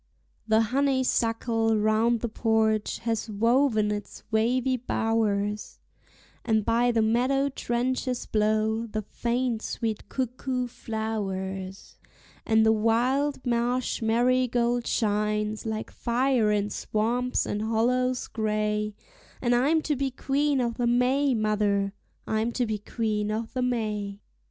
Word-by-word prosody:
The 220 0 +4
honeysuckle 230 -3 +1
round 215 +2 +2
the 235 - -1
porch 220 -1 +1
has 230 -1 -1
woven 225 0 +2
its 205 -1 -6
wavy 250 +4 +2
bowers, 215 -4 -1 0.7
And 220 -3 +1
by 235 +1 +3
the 225 -2 +2
meadow 255 +5 +2
trenches 250 0 -2
blow 220 +1 +1
the 215 0 -4
faint 235 +1 -1
sweet 225 -2 -4
cuckoo 255 0 -2
flowers; 195 -5 -5 0.5
And 220 -1 +4
the 220 - +5
wild 250 +6 +1
marsh 245 +1 0
marigold 240 +1 +2
shines 210 0 0
like 220 0 -4
fire 240 -2 +1
in 205 0 0
swamps 240 +6 0
and 205 - -2
hollows 245 +3 +1
gray; 210 -1 -1 0.4
And 245 -1 +1
I'm 295 +6 +3
to 300 - 0
be 275 0 -1
Queen 275 +1 0
o'the 235 0 -1
May, 255 +3 +2
mother, 205 -2 +1 0.3
I'm 220 +2 0
to 250 - 0
be 215 -2 -2
Queen 210 -1 -2
o'the 225 +4 -3
May. 210 -5 -2
225 Hz, 120 wpm, -27 LUFS, 215-250 Hz, 0.7 s, the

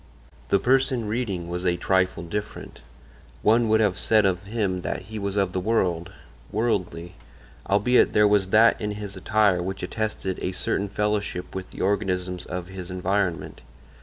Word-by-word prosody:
The 100 - +4
person 130 0 +1
reading 105 -6 -2
was 90 +1 -3
a 90 -1 +1
trifle 95 0 +1
different; 105 +5 -6 0.6
one 115 +1 +4
would 110 0 +4
have 100 -4 +1
said 110 -2 +3
of 95 -1 +1
him 100 -4 -1
that - - -4
he 110 +3 -7
was 100 -1 -3
of 95 -2 +1
the 95 - 0
world, 90 -4 0 0.4
worldly, 90 -6 -1 0.6
albeit 105 +6 +4
there 105 0 +5
was 100 -2 +2
that 110 +3 +5
in 105 -1 -2
his 105 -1 -7
attire 100 -1 +2
which 95 +2 -4
attested 110 -4 -3
a 95 - -2
certain 100 +2 -1
fellowship 105 -3 -2
with 95 -1 -6
the - - -8
organisms 90 -2 -1
of 90 -1 -4
his 95 -1 -8
environment. 90 -1 -2
100 Hz, 165 wpm, -25 LUFS, 90-105 Hz, 0.6 s, there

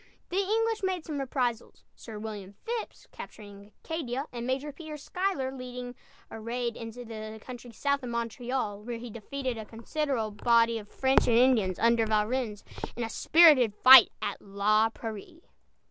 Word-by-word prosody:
The 360 - -3
English 445 +3 0
made 370 -4 -2
some 300 -3 -4
reprisals; 250 -3 -2
Sir 220 -2 -9
William 210 -3 -7
Phips 465 -1 -5
capturing 205 -1 -11
Acadia 280 -5 -3
and 240 0 -5
Major 270 +3 -2
Peter 305 +1 -9
Schuyler 360 -3 -2
leading 250 -1 -7 0.4
a 225 - -7
raid 235 +1 -3
into 230 +2 -8
the 215 -1 -7
country 245 +1 -10
south 280 +5 -1
of 250 - -6
Montreal, 235 -2 -3
where 235 +2 -5
he 235 0 -8
defeated 250 +2 -5
a - - -5
considerable 230 0 -3
body 230 +1 +3
of 205 -1 -13
French 265 0 +2
and 230 - +4
Indians 235 -7 +3
under 230 -1 +3
Valrennes, 215 0 -1 0.3
in 240 - -3
a 225 - -3
spirited 290 -11 +5
fight 255 +1 +9
at 200 - -3
La 210 +2 +2
Prairie. 225 - -8
240 Hz, 160 wpm, -28 LUFS, 220-270 Hz, 0.4 s, fight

